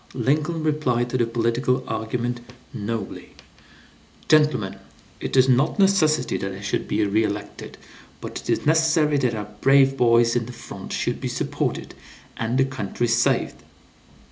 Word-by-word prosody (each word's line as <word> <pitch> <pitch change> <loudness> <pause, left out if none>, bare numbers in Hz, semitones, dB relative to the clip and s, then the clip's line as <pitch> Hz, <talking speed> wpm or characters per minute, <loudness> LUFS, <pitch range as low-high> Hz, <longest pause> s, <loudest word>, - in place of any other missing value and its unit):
Lincoln 150 +6 0
replied 125 -6 0
to 130 - 0
the 120 - +2
political 120 +3 0
argument 120 +2 -3 0.3
nobly: 105 -1 -5 0.9
"Gentlemen, 150 -10 +2 0.4
it - - -3
is 130 0 +6
not 130 +3 +2
necessary 195 -6 +2
that 95 0 -4
I 95 - -8
should 100 - -2
be 105 0 +1
re 105 +2 +2
elected, 105 -1 -5 0.4
but - - -6
it - - -11
is - - 0
necessary 155 -1 +3
that 125 -4 0
our 105 -1 -6
brave 135 0 +4
boys 115 -1 +4
in 115 -2 -1
the 125 - -8
front - - -9
should - - -2
be - - -2
supported, - - -3 0.4
and 115 +3 -2
the 135 - +4
country 120 -2 -3
saved." 120 +1 +1
120 Hz, 150 wpm, -23 LUFS, 115-145 Hz, 0.9 s, is